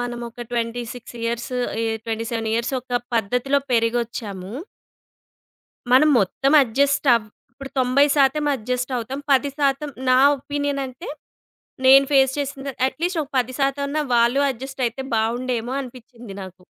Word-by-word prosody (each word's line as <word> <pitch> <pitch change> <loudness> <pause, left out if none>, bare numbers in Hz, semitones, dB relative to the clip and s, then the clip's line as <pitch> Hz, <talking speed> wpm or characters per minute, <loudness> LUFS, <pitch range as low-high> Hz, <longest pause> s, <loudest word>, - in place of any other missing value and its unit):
మనము 240 0 -4
ఒక 240 +1 -8
26 235 +1 -4
ఇయర్స్ 235 +2 -3 0.2
ఆహ్, - - -6 0.3
27 225 0 -3
ఇయర్స్ 235 +3 -1
ఒక 245 -1 -2 0.2
పద్ధతిలో 245 +6 +1
పెరిగొచ్చాము. 230 -4 -1 1.4
మనం 275 +4 +6
మొత్తం 270 +8 0
అడ్జస్ట్ 280 +4 +1
అవ్ 230 -2 -1 0.3
ఇప్పుడు 270 +2 -10
90% 275 +2 +3
అడ్జస్ట్ 250 +3 -3
అవుతాం, 250 +4 -4
10% 280 +1 +1 0.2
నా 255 0 +5 0.2
ఒపీనియన్ 285 0 -3
అంటే, 255 0 -10 0.8
నేను 270 +1 +8
ఫేస్ 265 -1 +5
చేసిన 275 -1 -4
అట్ - - -7
లీస్ట్ 355 -1 0
ఒక 280 - -15
10% 275 +3 0
అన్నా 305 +2 -1
వాళ్ళు 235 +4 +3
అడ్జస్ట్ 265 +2 -8
అయితే 240 +4 -6
బాగుండేమో 240 +2 -1
అనిపించింది 240 -3 -11
నాకు. 185 -1 -11
255 Hz, 130 wpm, -22 LUFS, 235-275 Hz, 1.4 s, నేను